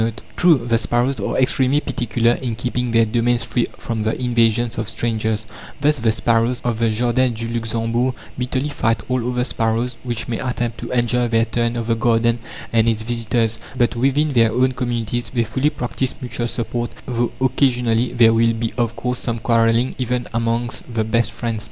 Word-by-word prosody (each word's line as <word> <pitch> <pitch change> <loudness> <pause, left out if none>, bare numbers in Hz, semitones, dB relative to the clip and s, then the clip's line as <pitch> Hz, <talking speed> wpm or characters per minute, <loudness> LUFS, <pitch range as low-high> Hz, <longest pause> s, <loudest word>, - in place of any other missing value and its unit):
"(17) 115 +2 -2
True, 175 -4 +5
the 115 -1 +2
sparrows 120 +3 0
are 100 - -2
extremely 130 +2 +2
particular 120 -4 0
in 120 -2 -2
keeping 125 +2 -2
their 115 0 +4
domains 120 +2 +1
free 120 - 0
from 115 -2 -3
the 110 +1 -1
invasions 120 -2 +1
of 110 -1 -2
strangers; 110 -2 -1 0.3
thus 145 0 +2
the 115 -1 +2
sparrows 115 +2 +1
of 120 -2 -1
the 115 -1 +2
Jardin 120 +3 +1
du 115 +1 -4
Luxembourg 115 +2 -1 0.2
bitterly 130 +3 -2
fight 115 -5 0
all 125 -1 0
other 125 0 0
sparrows 115 0 -1
which 120 -3 -3
may 115 - -2
attempt 120 -3 -2
to - - -6
enjoy 120 0 +1
their 115 0 +2
turn 115 +1 -1
of 115 -1 -2
the 115 - +1
garden 115 +1 +2 0.3
and 115 0 +4
its 110 -1 0
visitors; 115 -1 0 0.2
but 120 -1 +2
within 140 +4 +1
their 115 -3 +4
own 130 +3 +2
communities 120 -2 -2
they 120 -2 0
fully 130 +7 0
practise 130 -2 -3
mutual 120 -1 -3
support, 120 0 -3 0.2
though 120 -1 -1
occasionally 125 -3 +2
there 115 -2 +5
will 115 0 +3
be 115 0 -3
of 115 -1 0
course 125 0 -2
some 115 -1 -3
quarrelling 115 +2 +2
even 125 -1 -1
amongst 115 +1 -2
the 115 -2 0
best 115 +1 +1
friends. 115 -2 -3
120 Hz, 185 wpm, -20 LUFS, 115-125 Hz, 0.3 s, True